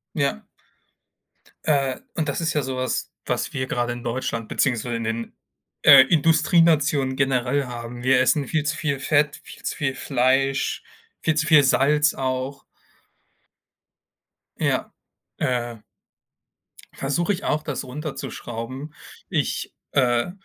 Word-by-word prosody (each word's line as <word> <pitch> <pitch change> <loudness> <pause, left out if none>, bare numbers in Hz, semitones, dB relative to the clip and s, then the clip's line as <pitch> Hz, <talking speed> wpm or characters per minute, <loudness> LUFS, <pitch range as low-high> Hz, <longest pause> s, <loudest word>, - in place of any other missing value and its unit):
Ja. 140 - -1 1.2
Äh, 140 -4 +1 0.2
und 160 -2 -1
das 145 - -1
ist 165 - +1
ja 150 - +1
so 130 -1 -4
was, 130 0 -1
was - - -1
wir 130 -1 -2
grade 120 -1 -1
in 120 0 -9
Deutschland 115 -2 -3
beziehungsweise 120 -3 +1
in 115 - -4
den, 115 +1 -4 0.5
äh, 140 -2 +10
Industrienationen 155 -3 +3
generell 135 +1 0
haben. 120 0 -7
Wir 130 0 +4
essen 140 +1 +2
viel 155 -2 0
zu 155 +1 +2
viel 140 -3 -1
Fett, 145 +1 +1
viel - - -13
zu - - -1
viel 135 -3 -2
Fleisch, 135 +1 0 0.4
viel 155 - +1
zu 150 +1 +2
viel 155 -2 +6
Salz 150 +3 +4
auch. 130 +1 -3 2.0
Ja, - - 0 0.5
äh 120 -2 -1 1.2
Versuche 170 +8 0
ich 190 - -6
auch, 150 +1 -1
das 145 -3 -3
runterzuschrauben. 130 -1 -6 0.4
Ich, - - -2 0.2
äh 125 +2 +1
135 Hz, 130 wpm, -23 LUFS, 125-150 Hz, 2.0 s, äh